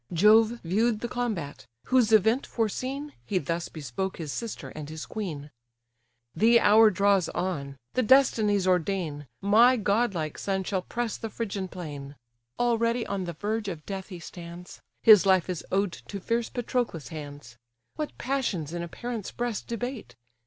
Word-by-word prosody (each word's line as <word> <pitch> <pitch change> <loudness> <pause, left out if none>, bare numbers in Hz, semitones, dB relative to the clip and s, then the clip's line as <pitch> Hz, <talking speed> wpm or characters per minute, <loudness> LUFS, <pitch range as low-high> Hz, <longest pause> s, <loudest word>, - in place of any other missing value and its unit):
Jove 220 +6 +5
view'd 215 +6 +1
the 240 - -2
combat: 220 - -4 0.2
whose 250 -4 +3
event 220 +5 +4
foreseen, 260 +6 -3
He 200 - -1
thus 170 +1 -2
bespoke 155 +6 -4
his 155 -4 -5
sister 230 -2 -5
and 150 -1 -8
his 155 0 -6
queen: 155 -9 -5 0.8
"The 230 +7 +5
hour 220 +1 +7
draws 200 -2 +2
on; 145 -7 -3 0.2
the 255 - +2
destinies 220 -6 +4
ordain, 180 -5 0
My 230 +6 +5
godlike 200 -7 0
son 190 -1 -1
shall 190 0 -1
press 235 +4 -3
the 225 - -5
Phrygian 200 -4 -4
plain: 145 -6 -8 0.4
Already 235 0 +1
on 195 -2 -3
the 170 - -4
verge 210 +5 -2
of 165 -6 -6
death 195 -1 -5
he 185 - -8
stands, 170 +1 -10 0.2
His 210 -3 +8
life 190 -2 +4
is 180 -4 -4
owed 195 0 +1
to 200 +3 -8
fierce 230 +4 -1
Patroclus' 240 - -2
hands, 145 -6 -9 0.4
What 305 -1 -5
passions 220 - -2
in 175 - -3
a 170 - -4
parent's 235 +3 -5
breast 240 -3 -3
debate! 235 - -5
200 Hz, 155 wpm, -27 LUFS, 170-230 Hz, 0.8 s, His